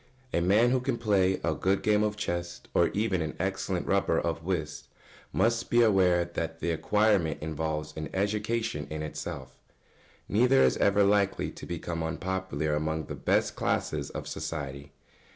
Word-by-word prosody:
] 130 Hz, 0 st, -31 dB
A 85 Hz, -, +2 dB
man 105 Hz, +7 st, +4 dB
who 130 Hz, -, +3 dB
can 125 Hz, -1 st, -1 dB
play 95 Hz, -5 st, +2 dB
a 85 Hz, -, +1 dB
good 95 Hz, +6 st, 0 dB
game 105 Hz, -1 st, +3 dB
of 105 Hz, 0 st, 0 dB
chess, 85 Hz, -3 st, -3 dB
or 85 Hz, -, +4 dB
even 100 Hz, -4 st, 0 dB
an 80 Hz, -1 st, -3 dB
excellent -, -, -2 dB
rubber -, -, +2 dB
of 80 Hz, -, -2 dB
whist, 80 Hz, -5 st, -3 dB, 0.4 s
must 115 Hz, 0 st, +1 dB
be 120 Hz, 0 st, +5 dB
aware 90 Hz, -5 st, +4 dB
that 80 Hz, -1 st, -4 dB
the 85 Hz, -, -1 dB
acquirement 100 Hz, -2 st, +2 dB
involves 80 Hz, 0 st, -3 dB
an 80 Hz, 0 st, -5 dB
education 105 Hz, -5 st, -1 dB
in 75 Hz, 0 st, -4 dB
itself. 65 Hz, -4 st, -6 dB, 0.7 s
Neither 125 Hz, +5 st, +4 dB
is -, -, +4 dB
ever 100 Hz, 0 st, +4 dB
likely 100 Hz, 0 st, +2 dB
to -, -, -10 dB
become 85 Hz, -1 st, -4 dB
unpopular 80 Hz, -3 st, -2 dB
among 80 Hz, +1 st, -1 dB
the -, -, -6 dB
best -, -, +1 dB
classes -, -, -1 dB
of -, -, -6 dB
society. 70 Hz, -2 st, -5 dB
90 Hz, 165 wpm, -28 LUFS, 80-105 Hz, 0.7 s, be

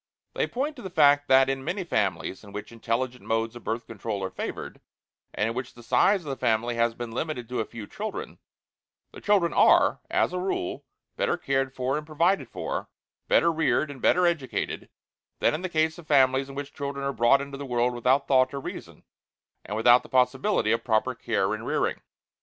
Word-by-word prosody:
They -, -, 0 dB
point 285 Hz, +5 st, -3 dB
to -, -, -9 dB
the 190 Hz, -, -6 dB
fact 145 Hz, -4 st, +4 dB
that 130 Hz, 0 st, +6 dB
in 135 Hz, 0 st, -2 dB
many 180 Hz, +6 st, -2 dB
families 100 Hz, -, -1 dB
in 100 Hz, -, -12 dB
which 105 Hz, +2 st, -7 dB
intelligent 120 Hz, +2 st, -3 dB
modes 115 Hz, +1 st, -1 dB
of 120 Hz, -, -10 dB
Birth 115 Hz, +1 st, -3 dB
Control 110 Hz, -3 st, -5 dB
are 95 Hz, -, -3 dB
favored, -, -, -6 dB, 0.5 s
and 105 Hz, -, -1 dB
in 115 Hz, -, -2 dB
which 130 Hz, 0 st, -5 dB
the 120 Hz, -, -13 dB
size 195 Hz, -, +3 dB
of 155 Hz, -, -8 dB
the -, -, -2 dB
family 120 Hz, 0 st, 0 dB
has 115 Hz, 0 st, +1 dB
been 120 Hz, -1 st, -6 dB
limited 125 Hz, -1 st, -4 dB
to 125 Hz, -, -2 dB
a 110 Hz, -, 0 dB
few 115 Hz, -3 st, -9 dB
children, 220 Hz, -, -6 dB, 0.7 s
the -, -, -12 dB
children 195 Hz, -5 st, +2 dB
are, -, -, +5 dB
as -, -, +1 dB
a 180 Hz, -, -1 dB
rule, 185 Hz, -, -3 dB, 0.3 s
better -, -, +1 dB
cared 135 Hz, -1 st, -1 dB
for 130 Hz, +3 st, -1 dB
and 150 Hz, -, -12 dB
provided 170 Hz, +5 st, +1 dB
for, -, -, -4 dB, 0.4 s
better 170 Hz, -, +4 dB
reared 155 Hz, -2 st, +1 dB
and 135 Hz, -, -11 dB
better 180 Hz, 0 st, +4 dB
educated, 165 Hz, -7 st, -2 dB, 0.5 s
than -, -, +2 dB
in 155 Hz, -, -3 dB
the 185 Hz, -, -3 dB
case 160 Hz, 0 st, 0 dB
of 165 Hz, -, -13 dB
families 135 Hz, -2 st, +3 dB
in 135 Hz, -, -9 dB
which 145 Hz, 0 st, -6 dB
children 140 Hz, -1 st, -4 dB
are 140 Hz, -, -1 dB
brought 120 Hz, +4 st, +4 dB
into 140 Hz, 0 st, -7 dB
the -, -, -5 dB
world 125 Hz, 0 st, +1 dB
without 130 Hz, +3 st, +2 dB
thought 130 Hz, 0 st, +3 dB
or -, -, -3 dB
reason, -, -, -8 dB, 0.6 s
and 105 Hz, -, -5 dB
without 120 Hz, +2 st, +6 dB
the -, -, -15 dB
possibility 130 Hz, -, +2 dB
of 115 Hz, 0 st, +1 dB
proper 110 Hz, -3 st, +1 dB
care -, -, -1 dB
and -, -, -5 dB
rearing. -, -, 0 dB
135 Hz, 205 wpm, -26 LUFS, 120-155 Hz, 0.7 s, that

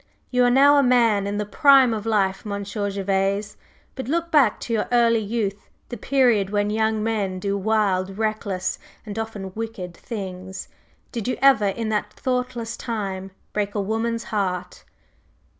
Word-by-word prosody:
You 250 Hz, -1 st, +3 dB
are -, -, +4 dB
now 280 Hz, +3 st, +6 dB
a -, -, +6 dB
man 230 Hz, -6 st, +3 dB
in 205 Hz, +1 st, -2 dB
the 210 Hz, -, -1 dB
prime 265 Hz, +2 st, +5 dB
of 215 Hz, 0 st, -4 dB
life, 195 Hz, -3 st, +1 dB
Monsieur 205 Hz, 0 st, -3 dB
Gervase, 195 Hz, +1 st, -1 dB, 0.4 s
but 260 Hz, -3 st, -6 dB
look 335 Hz, +3 st, -1 dB
back 275 Hz, -9 st, +4 dB
to 235 Hz, -, -3 dB
your 220 Hz, -, 0 dB
early 235 Hz, -1 st, +4 dB
youth, 205 Hz, -2 st, -3 dB, 0.2 s
the 240 Hz, -, -5 dB
period 240 Hz, -5 st, +2 dB
when 205 Hz, 0 st, 0 dB
young 220 Hz, 0 st, 0 dB
men 205 Hz, -4 st, -1 dB
do 200 Hz, +2 st, -2 dB
wild, 195 Hz, -2 st, 0 dB
reckless, 215 Hz, -4 st, -2 dB, 0.3 s
and 210 Hz, 0 st, -5 dB
often 210 Hz, -4 st, -5 dB
wicked 215 Hz, -6 st, -6 dB
things, 190 Hz, -3 st, -7 dB, 0.4 s
did 230 Hz, -3 st, -4 dB
you 255 Hz, -, -1 dB
ever 265 Hz, -7 st, +5 dB
in 220 Hz, +3 st, -2 dB
that 210 Hz, -1 st, -2 dB
thoughtless 250 Hz, -2 st, -2 dB
time 195 Hz, -5 st, -4 dB, 0.2 s
break 205 Hz, 0 st, -2 dB
a -, -, 0 dB
woman's 225 Hz, +3 st, -1 dB
heart?" 180 Hz, -4 st, -3 dB
215 Hz, 160 wpm, -23 LUFS, 200-235 Hz, 0.4 s, now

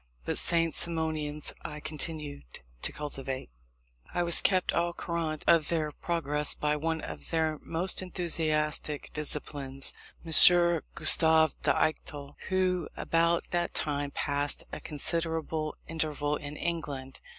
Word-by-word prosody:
But -, -, -2 dB
the -, -, -2 dB
St. 165 Hz, -2 st, +2 dB
Simonians 155 Hz, -3 st, -3 dB
I 150 Hz, -, -7 dB
continued 150 Hz, -, -5 dB, 0.2 s
to -, -, 0 dB
cultivate. 135 Hz, -, -6 dB, 0.6 s
I 175 Hz, -, -1 dB
was 170 Hz, -1 st, +6 dB
kept 185 Hz, -2 st, +1 dB
au 170 Hz, 0 st, -1 dB
courant 165 Hz, -3 st, -4 dB
of 165 Hz, -3 st, +4 dB
their 155 Hz, -3 st, -1 dB
progress 150 Hz, -2 st, -2 dB
by 150 Hz, 0 st, -1 dB
one 160 Hz, +1 st, -3 dB
of -, -, -7 dB
their 160 Hz, -2 st, -1 dB
most 175 Hz, +4 st, +1 dB
enthusiastic 155 Hz, -5 st, -1 dB
disciples, 140 Hz, -3 st, -2 dB, 0.3 s
M. 165 Hz, -, -8 dB, 0.6 s
Gustave 160 Hz, -2 st, +5 dB
d'Eichthal, 145 Hz, -2 st, -2 dB, 0.2 s
who 185 Hz, -2 st, -1 dB
about 170 Hz, +1 st, 0 dB
that 175 Hz, -1 st, -2 dB
time 145 Hz, -1 st, -2 dB
passed 145 Hz, 0 st, -1 dB
a -, -, -6 dB
considerable 160 Hz, 0 st, -1 dB
interval 150 Hz, -2 st, -2 dB
in 145 Hz, 0 st, -7 dB
England. 140 Hz, -6 st, -5 dB
155 Hz, 125 wpm, -28 LUFS, 145-165 Hz, 0.6 s, was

